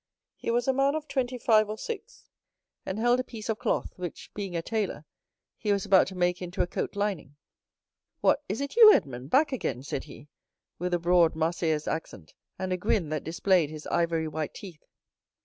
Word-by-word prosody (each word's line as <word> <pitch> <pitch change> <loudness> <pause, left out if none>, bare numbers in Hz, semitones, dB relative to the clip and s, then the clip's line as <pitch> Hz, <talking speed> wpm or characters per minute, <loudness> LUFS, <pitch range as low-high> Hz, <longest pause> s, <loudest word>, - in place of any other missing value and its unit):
He - - -5
was 240 +2 +1
a 265 - +3
man 275 +2 +2
of 310 -1 -4
twenty 255 -2 -1
five 215 -3 +3
or 215 - -4
six, 455 - -7 0.6
and 190 - -3
held 240 +2 +3
a - - 0
piece 225 -3 -8
of 220 - -1
cloth, - - -1
which, 180 -2 -7
being 195 -4 -5
a 165 - -1
tailor, 205 -8 -2 0.5
he 210 - 0
was 200 0 +1
about 195 -2 +5
to 190 - -7
make 180 0 0
into 180 0 -1
a - - 0
coat 175 - -4
lining. 200 -8 -2 0.8
"What, - - +3
is 215 +7 -2
it 280 +6 -4
you, 450 -2 +10
Edmond, 135 - 0
back 295 - +4
again?" 135 - -3
said 140 -1 -4
he, 145 - -13 0.5
with 180 +1 0
a - - -1
broad 170 -1 +4
Marseillaise 160 -1 0
accent, 100 - -5 0.2
and 185 -1 -2
a - - 0
grin 180 -2 0
that 155 -2 -2
displayed 170 -1 +2
his 155 0 -9
ivory 165 -2 0
white 155 0 -4
teeth. 185 -7 -11
185 Hz, 200 wpm, -28 LUFS, 160-225 Hz, 0.8 s, you